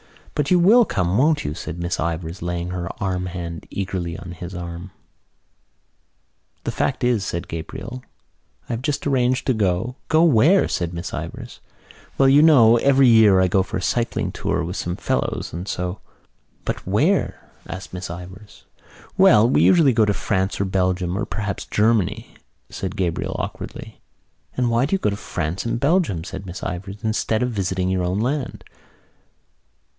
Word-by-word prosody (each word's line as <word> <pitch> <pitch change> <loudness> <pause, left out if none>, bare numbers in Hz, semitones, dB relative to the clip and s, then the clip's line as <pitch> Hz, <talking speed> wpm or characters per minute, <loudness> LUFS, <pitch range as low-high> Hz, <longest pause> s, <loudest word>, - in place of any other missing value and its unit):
"But 145 -1 -1
you 180 - +5
will 210 +8 +6
come, 90 - 0
won't 150 +2 +2
you?" 75 - -2
said 85 - -6
Miss 85 +1 -3
Ivors, 85 +1 -3
laying 85 +1 -3
her 90 -2 -4
warm 90 -1 -2
hand 85 -2 -6
eagerly 90 -3 -3
on 90 - -9
his 90 +1 -8
arm. 85 +1 -6 1.7
"The - - -2
fact 130 -1 -1
is," 120 -5 +2
said 85 -2 -4
Gabriel, 95 +9 -6 0.7
"I - - -3
have 115 - -3
just 145 +1 -2
arranged 130 -2 +1
to 130 - +2
go——" 110 +4 -1
"Go 160 +1 +4
where?" 165 - +5
asked 85 -2 -2
Miss 85 +1 -6
Ivors. - - -7 0.6
"Well, 135 - +5
you 140 +2 +6
know, 120 -8 +7
every 135 +1 +4
year 110 -5 +6
I 95 - +4
go 95 +2 +2
for 95 - -3
a - - -4
cycling 120 +5 -1
tour - - -2
with 90 +4 -4
some 90 0 -3
fellows 65 - -2
and 85 +4 -5
so——" 90 0 -3 0.7
"But - - -4
where?" - - 0 0.2
asked 95 0 -8
Miss 90 0 -5
Ivors. 95 +4 -10 0.5
"Well, 105 +2 +7
we 125 - +3
usually 160 -7 +5
go 110 -1 +4
to 105 - +1
France 95 -1 -1
or 100 - +1
Belgium 95 -1 0
or 105 - -1
perhaps 105 -2 -4
Germany," 105 -3 +1 0.4
said 95 +1 -5
Gabriel 90 -5 -2
awkwardly. - - -7 0.6
"And 125 -2 +1
why 120 +4 +2
do 195 - +1
you - - +2
go 105 - 0
to - - -2
France 90 -3 -4
and 115 - -1
Belgium," 140 - +1
said 95 +1 -7
Miss 90 - -7
Ivors, 95 +4 -6
"instead 110 +1 0
of 125 - -1
visiting 95 -3 -1
your 95 -1 0
own 90 +3 -1
land?" 130 +3 -2
100 Hz, 170 wpm, -22 LUFS, 90-125 Hz, 1.7 s, know